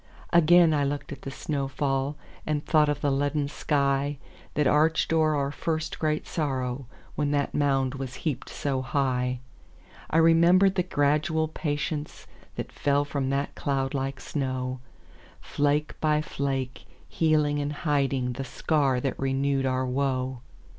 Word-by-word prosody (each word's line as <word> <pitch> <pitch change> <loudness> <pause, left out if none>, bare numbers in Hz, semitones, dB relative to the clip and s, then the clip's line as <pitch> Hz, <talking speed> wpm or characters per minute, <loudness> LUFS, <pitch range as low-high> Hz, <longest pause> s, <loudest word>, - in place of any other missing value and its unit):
Again 170 0 +6
I 145 -1 +2
looked 145 +1 -3
at - - -7
the - - -6
snow 140 0 -3
fall, 135 +1 -1 0.3
And 150 -1 -1
thought 155 -3 +4
of 145 -1 -1
the 145 - +1
leaden 145 +1 0
skyThat 140 0 -1
arched 155 +3 +3
o'er 155 -1 +3
our 140 -1 0
first 155 +1 -3
great 155 -1 0
sorrow, 130 -4 -2 0.3
When 145 -1 -1
that 145 -1 0
mound 135 -3 +1
was 135 -2 -5
heaped 150 -5 -2
so 135 -2 -2
high.I 125 - -3
remembered 170 +4 +5
the 190 - +1
gradual 155 -1 +1
patienceThat 150 -1 -5
fell 145 0 +1
from 140 -2 -2
that 140 +1 -1
cloud 135 -1 -1
like 135 -1 -2
snow, 130 -2 -3 0.6
Flake 145 +1 0
by 150 -1 +3
flake, 135 -3 -3 0.2
healing 150 -2 +2
and 145 0 -2
hidingThe 135 -4 0
scar 140 -2 +1
that 135 - -2
renewed 135 0 +1
our 130 0 0
woe. 130 -1 -1
140 Hz, 135 wpm, -27 LUFS, 135-150 Hz, 0.6 s, Again